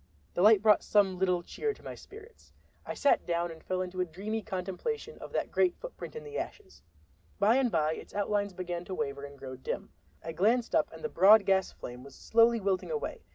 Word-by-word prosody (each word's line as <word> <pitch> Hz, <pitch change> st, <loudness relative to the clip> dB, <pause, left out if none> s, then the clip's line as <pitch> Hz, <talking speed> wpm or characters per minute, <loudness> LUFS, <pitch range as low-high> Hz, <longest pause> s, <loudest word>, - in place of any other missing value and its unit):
The -, -, -1 dB
light 210 Hz, +1 st, +6 dB
brought 215 Hz, -1 st, +6 dB
some 195 Hz, -3 st, +2 dB
little 180 Hz, -2 st, +1 dB
cheer 435 Hz, -, -3 dB
to -, -, -19 dB
my -, -, -6 dB
spirits. 440 Hz, +3 st, -14 dB, 0.3 s
I -, -, -4 dB
sat 285 Hz, -, +3 dB
down 170 Hz, 0 st, 0 dB
and 160 Hz, -1 st, -12 dB
fell 185 Hz, 0 st, -1 dB
into 185 Hz, 0 st, -4 dB
a -, -, +1 dB
dreamy 205 Hz, +7 st, -4 dB
contemplation 215 Hz, -, -4 dB
of -, -, -9 dB
that -, -, -1 dB
great 360 Hz, -1 st, +2 dB
footprint -, -, -8 dB
in 465 Hz, -, -6 dB
the 445 Hz, 0 st, -5 dB
ashes. 390 Hz, -3 st, -8 dB, 0.6 s
By 215 Hz, +4 st, +4 dB
and 260 Hz, -3 st, +2 dB
by 155 Hz, -2 st, +1 dB
its -, -, -10 dB
outlines 205 Hz, -1 st, 0 dB
began 175 Hz, -1 st, -4 dB
to 190 Hz, -, -5 dB
waver 140 Hz, -2 st, -3 dB
and 140 Hz, 0 st, -11 dB
grow 130 Hz, -1 st, -8 dB
dim. 130 Hz, -, -5 dB, 0.3 s
I 165 Hz, -, -4 dB
glanced 225 Hz, +9 st, +1 dB
up -, -, +2 dB
and -, -, -12 dB
the 465 Hz, -, -2 dB
broad 210 Hz, -, +6 dB
gas 190 Hz, -1 st, +2 dB
flame 125 Hz, +1 st, -9 dB
was 140 Hz, -, -13 dB
slowly 230 Hz, +1 st, +3 dB
wilting 195 Hz, -2 st, -1 dB
away. 460 Hz, -2 st, -3 dB
195 Hz, 215 wpm, -30 LUFS, 175-235 Hz, 0.6 s, light